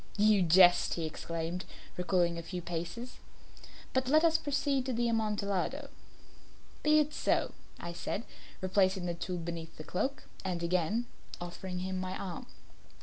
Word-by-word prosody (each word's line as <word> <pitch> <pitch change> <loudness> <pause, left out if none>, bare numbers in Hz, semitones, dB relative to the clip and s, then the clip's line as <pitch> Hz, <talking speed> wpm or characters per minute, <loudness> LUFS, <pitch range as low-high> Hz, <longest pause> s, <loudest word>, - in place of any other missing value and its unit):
"You 210 -1 +5
jest," 175 +1 +6
he 165 - -2
exclaimed, 165 +3 -3 0.3
recoiling 180 -2 +1
a - - -3
few 180 +2 -5
paces. 175 +9 -5 0.7
"But 260 -1 +1
let 310 +4 +5
us 325 -1 +5
proceed 285 -2 +1
to 260 - 0
the 240 +1 +1
Amontillado." 210 -4 0 0.9
"Be 300 0 +5
it 300 0 +3
so," - - +1 0.3
I 170 0 -5
said, 200 +5 -3 0.4
replacing 185 -1 +2
the 175 - -1
tool 180 +1 -3
beneath 165 -1 -5
the 155 - -7
cloak 265 - -2 0.2
and 175 -3 -2
again 180 +7 +1 0.3
offering 180 +1 -5
him 185 0 -2
my 185 0 -3
arm. 180 -4 -5
185 Hz, 145 wpm, -32 LUFS, 175-230 Hz, 0.9 s, jest